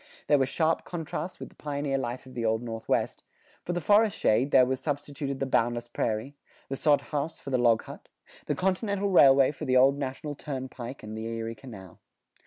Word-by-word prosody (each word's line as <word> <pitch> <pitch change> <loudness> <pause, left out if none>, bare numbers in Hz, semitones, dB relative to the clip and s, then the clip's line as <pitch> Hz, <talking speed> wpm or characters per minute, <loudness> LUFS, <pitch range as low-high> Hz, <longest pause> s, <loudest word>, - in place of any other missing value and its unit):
There 145 - +4
were 135 - +2
sharp 160 +2 +1
contrasts 170 +1 -5
with - - -7
the - - -23
pioneer 140 -2 -2
life 125 0 -4
of 130 - -13
the 120 - -3
Old 110 +1 +1
Northwest; 115 -1 -2 0.4
for - - -3
the 175 - -1
forest 205 +4 +4
shade, 120 +6 +2
there 130 -2 +6
was 130 0 -1
substituted 145 0 -3
the 135 - 0
boundless 120 -2 0
prairie; 115 +4 -2 0.3
the 135 - -2
sod 145 +1 +3
house 150 +2 -3
for 140 - -8
the 130 - +2
log 115 -2 +4
hut; - - -11 0.4
the - - 0
continental 195 +1 0
railway 135 -6 +7
for 145 - -7
the 130 0 +3
old 135 +2 +5
National 140 +2 -4
Turnpike 130 -3 -6
and 110 0 -7
the 110 0 -5
Erie 115 0 -4
Canal. 110 -6 -12
135 Hz, 195 wpm, -28 LUFS, 120-150 Hz, 0.4 s, railway